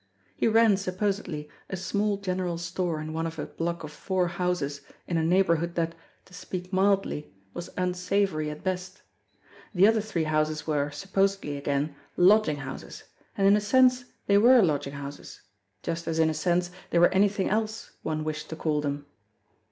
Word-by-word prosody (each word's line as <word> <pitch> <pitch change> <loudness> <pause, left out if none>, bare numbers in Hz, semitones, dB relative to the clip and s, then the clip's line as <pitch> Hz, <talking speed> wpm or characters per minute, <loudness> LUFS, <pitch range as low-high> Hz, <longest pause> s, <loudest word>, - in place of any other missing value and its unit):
He - - +1
ran, 225 -2 +5
supposedly, 190 -5 -2 0.2
a 190 - -3
small 200 +2 0
general 185 -3 -2
store 175 -1 -2
in 155 +1 -5
one 165 +1 -1
of 165 0 -7
a 150 - -3
block 170 0 -4
of 155 - -7
four 180 +3 -1
houses 170 -5 -2 0.2
in 175 - -3
a 165 - +2
neighbourhood 170 -1 +2
that, 165 -1 0 0.3
to - - -20
speak 180 0 -6
mildly, 195 -5 +1 0.2
was 175 - -6
unsavory 180 -3 0
at 150 0 -8
best. 185 +1 -4 0.7
The 185 +2 +6
other 220 0 +4
three 200 -6 -2
houses 155 -1 0
were, 145 -2 0
supposedly 195 0 -1
again, 140 +1 -1 0.2
lodging 185 -4 +5
houses, 135 -2 -8 0.3
and 195 - +2
in 200 - +7
a 210 - +2
sense 250 +3 +4 0.2
they 200 0 +5
were 240 +1 +7
lodging 145 -4 0
houses, 140 0 -8 0.4
just 165 0 -3
as 165 -1 -1
in 160 -1 +3
a - - -2
sense 175 +3 0 0.2
they - - +1
were 175 +1 +6
anything 195 0 +2
else 220 +1 -2
one 155 -1 -2
wished 155 -1 -4
to 160 - -5
call 155 -2 0
them. 145 0 -3
175 Hz, 175 wpm, -27 LUFS, 155-195 Hz, 0.7 s, in